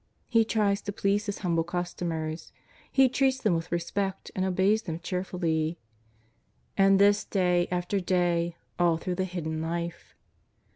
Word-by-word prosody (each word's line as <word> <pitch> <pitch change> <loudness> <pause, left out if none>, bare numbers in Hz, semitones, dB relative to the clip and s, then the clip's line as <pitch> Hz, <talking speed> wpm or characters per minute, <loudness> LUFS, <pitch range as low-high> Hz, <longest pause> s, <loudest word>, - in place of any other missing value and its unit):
He 230 -2 +4
tries 210 -2 +1
to 205 - -4
please 200 +1 0
His 200 - -2
humble 165 -2 +2
customers; 170 -2 -4 0.4
He 265 -1 +5
treats 265 +1 +2
them 215 -8 +1
with 165 -1 -2
re 170 - +2
spect 190 +3 -3
and 185 - 0
obeys 190 +3 +2
them 165 -6 -5
cheerfully. 170 -3 -1 1.0
And 195 0 +5
this 205 +1 +5
day 180 -3 +1
after 180 +2 -1
day, 175 -2 +1 0.2
all 170 -2 +3
through 180 +2 -3
the 185 +1 -1
Hidden 160 -3 -4
Life 170 +1 -4
180 Hz, 150 wpm, -28 LUFS, 170-200 Hz, 1.0 s, He